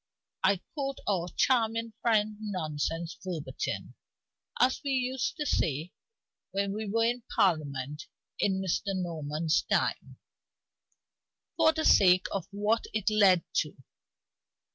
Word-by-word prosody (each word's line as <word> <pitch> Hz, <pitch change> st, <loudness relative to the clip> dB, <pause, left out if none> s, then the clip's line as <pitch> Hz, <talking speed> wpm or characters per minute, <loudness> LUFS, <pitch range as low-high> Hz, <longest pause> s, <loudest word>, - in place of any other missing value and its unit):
I 195 Hz, -1 st, +3 dB
quote 275 Hz, -3 st, -3 dB
our 180 Hz, -4 st, +1 dB
charming 230 Hz, -2 st, +2 dB
friend's 215 Hz, -2 st, +1 dB
nonsense, 165 Hz, -4 st, -3 dB
verbatim 170 Hz, -5 st, -4 dB, 0.7 s
(as 255 Hz, +1 st, +3 dB
we 280 Hz, -, -2 dB
used 260 Hz, +3 st, -1 dB
to 295 Hz, -, -2 dB
say 160 Hz, -, 0 dB, 0.6 s
when 200 Hz, 0 st, -1 dB
we 215 Hz, 0 st, -4 dB
were 225 Hz, +2 st, +2 dB
in 240 Hz, +1 st, 0 dB
Parliament 150 Hz, -5 st, 0 dB, 0.3 s
in 190 Hz, -2 st, +1 dB
Mr. 190 Hz, +2 st, -1 dB
Norman's 160 Hz, -2 st, -1 dB
time), -, -, -1 dB, 1.4 s
for 320 Hz, -1 st, +5 dB
the 315 Hz, 0 st, -2 dB
sake 185 Hz, -2 st, +6 dB
of 195 Hz, -, -3 dB
what 210 Hz, +3 st, 0 dB
it 215 Hz, 0 st, 0 dB
led 195 Hz, -5 st, +5 dB
to. 150 Hz, -, 0 dB
200 Hz, 120 wpm, -29 LUFS, 170-230 Hz, 1.4 s, sake